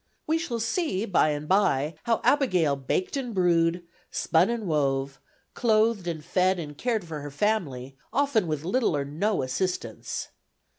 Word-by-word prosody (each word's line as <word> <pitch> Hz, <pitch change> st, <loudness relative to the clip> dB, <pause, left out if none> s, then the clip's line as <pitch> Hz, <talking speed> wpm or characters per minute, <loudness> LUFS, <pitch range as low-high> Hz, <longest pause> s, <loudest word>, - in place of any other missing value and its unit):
We 320 Hz, +1 st, +1 dB
shall 250 Hz, -9 st, -3 dB
see 225 Hz, -, -1 dB
by 180 Hz, -6 st, +3 dB
and 150 Hz, 0 st, -3 dB
by 165 Hz, -6 st, +2 dB
how 230 Hz, -1 st, +1 dB
Abigail 185 Hz, -, +3 dB
baked 140 Hz, -, -2 dB
and 250 Hz, -5 st, -3 dB
brewed, 175 Hz, -1 st, +2 dB, 0.3 s
spun 170 Hz, +4 st, +2 dB
and 235 Hz, -2 st, -2 dB
wove, 135 Hz, -4 st, 0 dB, 0.3 s
clothed 220 Hz, -4 st, +2 dB
and 160 Hz, -3 st, -4 dB
fed 185 Hz, 0 st, +2 dB
and 150 Hz, -4 st, -6 dB
cared 225 Hz, -, -1 dB
for 160 Hz, -2 st, -6 dB
her 145 Hz, -, -6 dB
family, 140 Hz, -7 st, -1 dB, 0.2 s
often 260 Hz, -8 st, +2 dB
with 155 Hz, -1 st, -3 dB
little 220 Hz, -, +1 dB
or 140 Hz, -, -2 dB
no 165 Hz, +5 st, -1 dB
assistance. 180 Hz, +8 st, -3 dB
180 Hz, 155 wpm, -26 LUFS, 150-225 Hz, 0.3 s, by